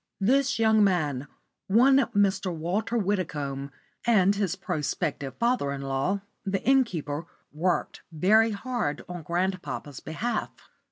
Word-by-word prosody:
This 270 +7 +2
young 220 -1 +4
man 150 -8 +1 0.4
one 250 +7 +5 0.2
Mr. 195 -2 +2
Walter 180 +8 -1
Widdicombe 150 -9 -2 0.3
and 200 -4 +4
his 195 -3 -1
prospective 145 -4 -3
father 235 - +1
in 140 0 -4
law, 135 +9 -1 0.2
the 195 -2 -2
innkeeper, 170 - +1 0.3
worked 170 +3 -1
very 210 +8 +4
hard 220 - -3
on 180 -1 -6
grandpapa's 175 -4 -3
behalf. 225 +10 -3
190 Hz, 115 wpm, -27 LUFS, 155-220 Hz, 0.4 s, one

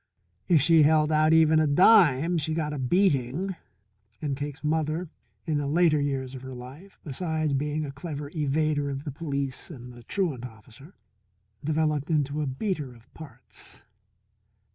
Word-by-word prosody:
If 160 -5 +4
she 165 0 +5
held 155 +1 +4
out 155 0 +3
even 160 -1 +5
a 155 - +2
dime, 170 - +5
she 155 +1 -1
got 150 -2 -2
a 145 - -4
beating. 170 +3 +1 0.6
And 145 -3 -2
Cake's 145 +2 -6
mother, 155 +2 -1 0.4
in 155 -3 0
the 145 - -2
later 155 0 +3
years 135 -2 -2
of 130 - -8
her 130 -1 -8
life, 135 +11 -12
besides 155 0 -2
being 150 +2 -1
a 140 - -6
clever 145 0 -7
evader 150 -1 0
of 135 0 -5
the 150 - -5
police 140 -3 -4
and 125 -6 -10
the 120 - -13
truant 150 - -2
officer, 125 - -13 0.7
developed 155 -1 0
into 150 -1 0
a 150 - -2
beater 140 - -3
of 115 +1 -22
parts. 155 -4 -11
150 Hz, 160 wpm, -26 LUFS, 135-160 Hz, 0.7 s, she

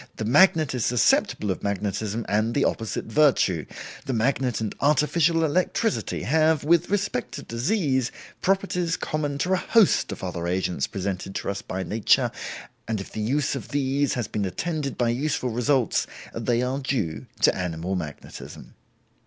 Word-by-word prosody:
The 110 - -4
magnet 155 - +5
is 125 -3 -1
susceptible 110 -3 +2
of 95 - -4
magnetism 105 +2 -2
and 110 +3 +1
the 140 - +3
opposite 110 -1 -2
virtue. 110 - +2 0.4
The 135 - -1
magnet 125 0 +1
and 110 -2 -3
artificial 160 +3 +3
electricity 185 +7 0
have, 155 +2 +3
with 170 +3 +3
respect 200 -10 -1
to - - -6
disease, 130 - 0 0.3
properties 180 -3 +1
common 145 -2 -2
to 180 +6 0
a - - +3
host 220 +2 +3
of - - -7
other 85 -2 -3
agents 90 -4 -1
presented 95 0 -4
to - - -2
us 100 - -5
by 95 +1 -4
nature, 105 +4 +2 0.6
and 110 -2 -1
if 95 - -8
the 110 - -4
use 135 +6 0
of - - -5
these 140 0 0
has 120 -4 -2
been 105 - -2
attended 145 - -3
by 120 -1 +2
useful 130 0 -1
results, 125 +1 +1 0.3
they 120 +1 0
are 130 +2 -1
due 125 - -2
to - - +5
animal 90 0 -3
magnetism. 75 -5 -8
125 Hz, 160 wpm, -25 LUFS, 105-150 Hz, 0.6 s, magnet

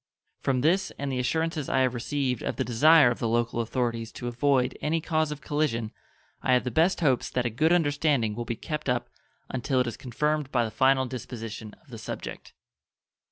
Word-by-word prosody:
From 130 -2 0
this 180 +7 +2
and 140 -1 -3
the 130 - -1
assurances 160 +3 -1
I 130 - +2
have 130 -1 +2
received 125 0 -2
of - - -3
the - - -1
desire 135 +3 +6
of 120 - -4
the 115 - 0
local 120 +1 0
authorities 115 -1 -2
to 120 - -6
avoid 125 +1 +1
any 160 +2 +1
cause 155 -2 0
of 150 -1 -6
collision 130 -7 -1 0.5
I 130 - +2
have 125 - +3
the 125 - -3
best 170 +4 +2
hopes 135 -6 +2
that 125 -1 -1
a 120 - 0
good 155 +9 +2
understanding 145 -8 +2
will 120 +3 -4
be 115 - -3
kept 150 +3 -4
up 120 -1 -1 0.4
until 130 +1 0
it 125 - +2
is 120 - -5
confirmed 150 +3 -1
by 120 -2 +2
the 110 - -5
final 130 +3 +3
disposition 115 -4 -7
of 155 - -25
the 115 - -8
subject. - - -7
130 Hz, 205 wpm, -27 LUFS, 120-150 Hz, 0.5 s, desire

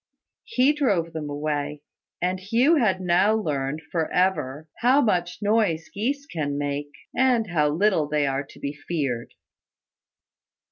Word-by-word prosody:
He 295 - +3
drove 195 - 0
them 155 -2 -4
away, 145 0 -3 0.4
and 185 +1 0
Hugh 235 - +3
had 210 -8 +2
now 185 +4 +3
learned, 150 -6 -2
for 165 -2 -1
ever, 160 -5 0
how 255 +4 +4
much 180 -6 0
noise 205 -7 +1
geese 270 +8 -2
can 145 - -3
make, 145 0 -2 0.3
and 250 -4 +3
how 150 -3 +2
little 165 -1 +2
they 150 -1 +1
are 135 0 -1
to 145 - -16
be 140 0 -3
feared. 145 -6 -3
170 Hz, 140 wpm, -25 LUFS, 145-215 Hz, 0.4 s, how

